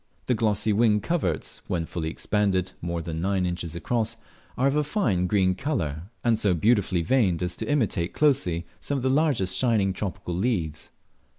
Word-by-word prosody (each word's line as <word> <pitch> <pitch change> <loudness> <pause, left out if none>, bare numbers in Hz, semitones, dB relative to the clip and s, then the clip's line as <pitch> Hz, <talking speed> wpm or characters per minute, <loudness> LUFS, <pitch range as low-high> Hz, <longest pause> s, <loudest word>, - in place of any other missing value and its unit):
The 125 - +2
glossy 110 -1 +1
wing 105 0 +4
coverts 105 - -2
(when 85 -2 -1
fully 80 -1 -3
expanded, 95 0 0
more 85 -1 -3
than 80 -1 -4
nine 95 0 +1
inches 85 -2 -3
across) 110 +6 -1 0.4
are 130 - +2
of 140 +1 +3
a 150 - +3
fine 110 - 0
green 95 -2 +3
colour 90 - -2 0.2
and 115 -2 +2
so 100 -5 +2
beautifully 95 -2 +2
veined 95 -6 +2
as 90 0 -2
to - - -4
imitate 110 -11 +1
closely 110 - +1
some 145 - -2
of 130 - -4
the 130 - +2
large 140 - +2
shining 100 -1 +2
tropical 90 -2 -4
leaves. 85 -6 -1
100 Hz, 175 wpm, -26 LUFS, 85-120 Hz, 0.4 s, wing